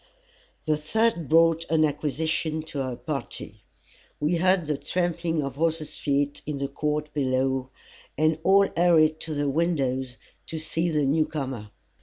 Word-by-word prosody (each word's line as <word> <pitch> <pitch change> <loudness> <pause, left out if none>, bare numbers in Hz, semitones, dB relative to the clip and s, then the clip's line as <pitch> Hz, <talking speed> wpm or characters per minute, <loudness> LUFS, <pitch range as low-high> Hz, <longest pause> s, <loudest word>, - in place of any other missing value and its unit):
The 155 -1 +2
third 170 - 0
brought 165 0 +4
an 160 -1 +4
acquisition 155 +2 -1
to 150 -3 -4
our 130 -2 -3
party. 130 +1 -6 0.6
We 155 +4 +1
heard 185 0 +3
the 150 0 0
trampling 165 +1 -1
of 140 -1 -5
horses' 155 -1 -1
feet 145 0 0
in 150 -2 -2
the 140 0 -2
court 150 +1 -2
below, 130 -1 0 0.5
and 155 +1 +2
all 195 +3 +5
hurried 160 -3 +4
to 155 -2 -5
the 145 0 0
windows, 135 -5 0 0.3
to 160 - -5
see 165 +2 -1
the 150 -2 +1
new 150 +3 +2
comer. 130 -8 -5
155 Hz, 150 wpm, -26 LUFS, 140-165 Hz, 0.6 s, all